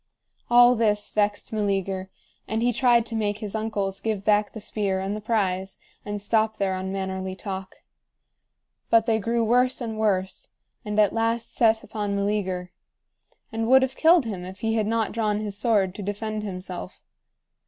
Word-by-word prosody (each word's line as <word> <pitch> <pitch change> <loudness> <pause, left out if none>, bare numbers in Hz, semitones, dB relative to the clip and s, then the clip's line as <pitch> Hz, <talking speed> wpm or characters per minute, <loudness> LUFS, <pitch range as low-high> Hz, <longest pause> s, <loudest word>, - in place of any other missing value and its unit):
All 245 +1 +7
this 210 -2 +1
vexed 205 +1 0
Meleager, 195 -2 -1 0.4
and 220 +1 -1
he 245 0 +2
tried 240 -1 +4
to 230 - -5
make 210 -2 0
his 210 -2 -6
uncles 205 -3 -2
give 215 -3 -2
back 210 0 +2
the 220 - -6
spear 200 -2 -2
and 195 +2 -2
the 215 - -6
prize, 195 -4 -1 0.3
and 205 0 -4
stop 220 +1 +1
their 195 -1 0
unmannerly 190 0 -3
talk. 190 0 -7 1.1
But 225 -1 +5
they 225 -2 +2
grew 230 +2 0
worse 250 +3 +3
and 225 -3 -4
worse, 190 -3 0 0.3
and 210 -1 -2
at 210 -2 +4
last 230 +1 -1
set 225 -1 +3
upon 205 -1 -3
Meleager, 195 -3 -1 0.8
and 225 0 -2
would 265 +2 +6
have 265 0 -2
killed 330 -3 +5
him 195 -5 -4
if 185 +2 -9
he 225 0 0
had 215 -2 +1
not 225 0 0
drawn 210 -2 0
his 210 -2 -4
sword 205 -4 +2
to 205 - -7
defend 215 +2 -3
himself. 185 -2 -7
210 Hz, 170 wpm, -25 LUFS, 195-225 Hz, 1.1 s, All